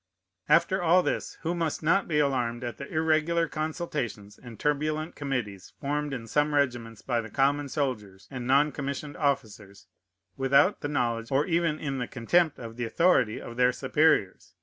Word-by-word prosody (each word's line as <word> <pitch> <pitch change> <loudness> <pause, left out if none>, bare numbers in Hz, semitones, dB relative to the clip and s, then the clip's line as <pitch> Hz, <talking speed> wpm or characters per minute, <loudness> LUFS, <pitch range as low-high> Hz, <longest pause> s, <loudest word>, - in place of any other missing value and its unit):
"After 190 0 +3
all 175 +2 +4
this, - - -3
who 170 +1 0
must 165 -3 -2
not 190 +5 +2
be 155 - 0
alarmed 125 -4 0
at 120 -3 -5
the 140 - -8
irregular 160 +1 +1
consultations 150 - -4
and 120 -3 -12
turbulent 155 +2 -1
committees 120 -9 -4
formed 145 0 -2
in 125 -4 -5
some 150 +5 +1
regiments 120 -6 -1
by 120 -3 0
the 115 - -9
common 140 +2 +1
soldiers 105 -10 -3
and 125 -2 -5
non 140 +3 +4
commissioned 140 +1 -5
officers, 110 -8 -3 0.5
without 140 +8 +3
the - - -2
knowledge, 120 -5 -1
or 135 +2 +2
even 170 -3 +1
in 135 -5 -3
contempt 155 +7 +1
of 115 -1 -9
the 120 - -3
authority, 115 -3 +2
of 120 - -9
their 125 0 +4
superiors? 130 - +1
140 Hz, 165 wpm, -27 LUFS, 120-155 Hz, 0.5 s, all